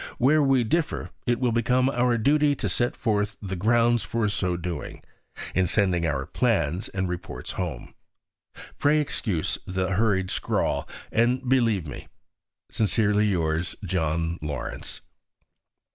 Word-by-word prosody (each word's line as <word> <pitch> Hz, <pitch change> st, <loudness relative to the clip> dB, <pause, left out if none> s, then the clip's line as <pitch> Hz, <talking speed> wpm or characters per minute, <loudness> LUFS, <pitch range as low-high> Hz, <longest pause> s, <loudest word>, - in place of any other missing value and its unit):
Where 150 Hz, +5 st, +4 dB
we 135 Hz, -3 st, +3 dB
differ, 160 Hz, +8 st, -1 dB, 0.2 s
it 120 Hz, -1 st, +2 dB
will 125 Hz, -2 st, +1 dB
become 125 Hz, +2 st, +2 dB
our 125 Hz, -2 st, +2 dB
duty 145 Hz, +4 st, +3 dB
to -, -, -2 dB
set 120 Hz, 0 st, 0 dB
forth 105 Hz, -2 st, -1 dB
the 95 Hz, -2 st, -4 dB
grounds 115 Hz, +4 st, +3 dB
for 115 Hz, -2 st, -1 dB
so 90 Hz, -3 st, -1 dB
doing, 85 Hz, -4 st, -6 dB, 0.5 s
in 95 Hz, -1 st, +2 dB
sending 90 Hz, -3 st, +1 dB
our 70 Hz, -3 st, -1 dB
plans 95 Hz, -, 0 dB
and 95 Hz, -1 st, -2 dB
reports 90 Hz, +1 st, -5 dB
home. 85 Hz, -9 st, -5 dB, 0.9 s
Pray 150 Hz, +2 st, +4 dB
excuse 110 Hz, -, -1 dB
this 95 Hz, 0 st, -1 dB
hurried 95 Hz, -2 st, +1 dB
scrawl, -, -, -1 dB, 0.2 s
and 125 Hz, +3 st, +1 dB
believe 115 Hz, -9 st, +2 dB
me, 70 Hz, -, -8 dB, 0.6 s
Sincerely 105 Hz, -1 st, +2 dB
yours, 80 Hz, -1 st, -1 dB
JOHN 85 Hz, -1 st, -1 dB
LAWRENCE. 75 Hz, -4 st, -5 dB
105 Hz, 130 wpm, -25 LUFS, 90-120 Hz, 0.9 s, Where